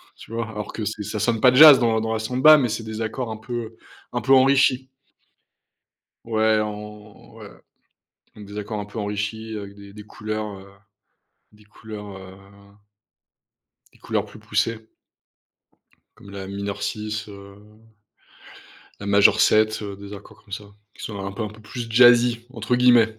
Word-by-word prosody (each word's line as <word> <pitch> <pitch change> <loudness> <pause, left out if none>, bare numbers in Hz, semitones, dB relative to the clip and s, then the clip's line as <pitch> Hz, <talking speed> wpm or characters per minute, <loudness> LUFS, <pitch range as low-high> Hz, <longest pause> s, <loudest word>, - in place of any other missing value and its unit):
tu - - -15
vois? 115 0 -3
Alors 105 -2 -7
que 110 - -4
c'est 110 0 -4
ça 105 - -5
sonne 110 +1 0
pas 125 - +6
jazz 145 +1 +10
dans 115 -2 +2
dans 110 0 -2
la 110 - -2
samba, 130 +7 +6
mais 125 -4 0
c'est 110 +1 -4
des 110 0 -6
accords 115 +2 -4
un 110 - -5
peu, 115 0 -6 0.4
un - - -1
peu 135 - -1
enrichis. 130 -1 +4 1.4
Ouais, 110 -1 +2
en 105 0 -8
ouais. - - -11 0.9
Mmh, 105 - -10
des 100 +1 -8
accords 105 +1 -4
un 100 - -6
peu 105 +3 -9
enrichis 105 +2 -4
avec 100 -1 -9
des 100 0 -14
des 105 +1 -11
couleurs, 110 0 -5
heu, 95 - -14 0.9
des 105 0 -21
couleurs, 105 -1 -10
heu, 95 0 -12 1.6
des - - -24
couleurs - - -2
plus - - -14
poussées 110 -1 -2 1.2
comme 100 - -15
la 100 -1 -7
mineur 100 +1 -5
6, 110 -1 -4
heu, 100 -1 -12 1.4
la 100 - -7
majeure 100 0 +5
7, 110 0 +3
heu, 100 -1 -6
des 100 0 -11
accords 100 - -14
comme 100 - -18
ça, 105 - -5 0.3
qui - - -13
sont 100 -3 -6
un 95 - -5
peu 100 - -5
un 105 - -3
peu 105 +1 -15
plus 115 +2 -7
«jazzy» 120 0 +5
entre 115 -1 -2
guillemets. 120 -3 +4
110 Hz, 170 wpm, -23 LUFS, 105-115 Hz, 1.6 s, jazz